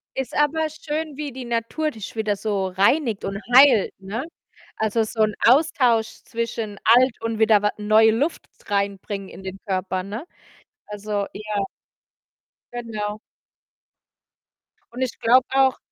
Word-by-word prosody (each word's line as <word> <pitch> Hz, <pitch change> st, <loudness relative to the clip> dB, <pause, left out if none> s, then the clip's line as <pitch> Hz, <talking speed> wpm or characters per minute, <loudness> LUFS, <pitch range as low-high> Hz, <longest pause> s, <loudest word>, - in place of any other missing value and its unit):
Ist 265 Hz, -2 st, -4 dB
aber 310 Hz, +2 st, +2 dB
schön, 310 Hz, -1 st, -5 dB
wie 295 Hz, -2 st, -4 dB
die 255 Hz, 0 st, -8 dB
Natur 235 Hz, +7 st, -2 dB
dich 220 Hz, -2 st, -9 dB
wieder 215 Hz, -2 st, 0 dB
so 195 Hz, -2 st, -2 dB
reinigt 210 Hz, +4 st, +1 dB
und 195 Hz, 0 st, -4 dB, 0.2 s
heilt, 260 Hz, -7 st, +7 dB
ne? 210 Hz, +8 st, -5 dB, 0.5 s
Also, 220 Hz, +1 st, +1 dB
so 220 Hz, 0 st, -3 dB
'n 215 Hz, 0 st, +1 dB
Austausch 245 Hz, -5 st, +3 dB
zwischen 225 Hz, -3 st, -4 dB, 0.2 s
alt 255 Hz, -1 st, +4 dB
und 230 Hz, -1 st, -3 dB
wieder 220 Hz, -2 st, +5 dB
wa 210 Hz, -, +1 dB
neue 215 Hz, +1 st, +5 dB
Luft 280 Hz, +9 st, -1 dB, 0.2 s
reinbringen 200 Hz, -1 st, -2 dB
in 190 Hz, -, -12 dB
den 190 Hz, +1 st, -7 dB
Körper, 185 Hz, -1 st, -2 dB
ne? 215 Hz, -, -6 dB, 0.6 s
Also, 210 Hz, -1 st, -3 dB
ja 210 Hz, -1 st, -3 dB, 1.1 s
Genau. 215 Hz, -3 st, -4 dB, 1.7 s
Und 250 Hz, -, -6 dB
ich 255 Hz, -3 st, -2 dB
glaube 250 Hz, +2 st, +4 dB
auch 265 Hz, -1 st, +3 dB
220 Hz, 135 wpm, -23 LUFS, 205-255 Hz, 1.7 s, heilt